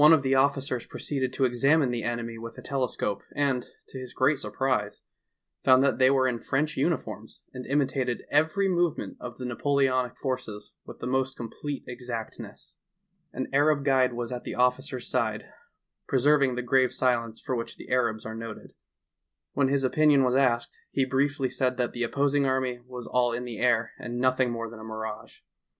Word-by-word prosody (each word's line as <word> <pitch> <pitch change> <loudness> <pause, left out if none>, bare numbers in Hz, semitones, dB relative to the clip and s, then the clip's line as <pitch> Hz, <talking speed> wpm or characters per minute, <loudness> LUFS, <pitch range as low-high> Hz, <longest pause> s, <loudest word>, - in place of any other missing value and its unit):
of 160 -4 +5
the 135 0 +2
officers 135 -2 +1
proceeded 130 -3 -2
to 135 - +1
examine 135 +3 +3
the 120 -1 -2
enemy 115 0 -3
with 115 +1 -8
a - - -8
telescope, 125 -7 -1
and 135 -4 0 0.2
to 130 - -8
his 125 -1 -9
great 135 +2 +3
surprise 125 -7 -1 0.6
found 130 0 +6
that 140 -1 +2
they 130 0 +6
were 130 -1 +3
in 120 -2 -1
French 150 +5 -1
uniforms 115 -8 -2
and 125 -1 -7
imitated 135 -3 0
every 160 +7 +3
movement 175 -3 0
of 120 -1 -7
the 125 - -6
Napoleonic 130 0 +1
forces 125 -6 -4
with - - -9
the - - -7
most 130 +1 0
complete 135 +4 -5
exactness. 120 -2 -7 0.5
An - - -3
Arab 145 0 +3
guide 130 -2 +3
was 120 0 -4
at 125 -1 -4
the - - -5
officer's 125 +1 +1
side, - - -1 0.7
preserv 140 +2 +4
ing 130 -2 +1
the 125 - -2
grave 130 +1 +3
silence 115 -3 0
for 130 - -3
which 115 -1 -5
the - - -11
Arabs 120 -4 +1
are 110 - -5
noted. 115 -1 -8 0.8
When 140 -2 +2
his 140 0 +1
opinion 145 +1 +4
was 125 0 +2
asked, 120 -3 +2
he 135 - +1
briefly 135 0 0
said 125 -1 0
that 125 -1 -1
the 120 - -5
opposing 140 +3 +2
army 130 -2 0
was 125 -2 -7
all 125 -1 +1
in 120 +1 -3
the 120 -3 -6
air 115 -2 +2
and 120 0 -5
nothing 130 0 +2
more 115 -1 -3
than 115 0 -10
a - - -10
mirage. 110 -1 -7
130 Hz, 180 wpm, -27 LUFS, 120-135 Hz, 0.8 s, found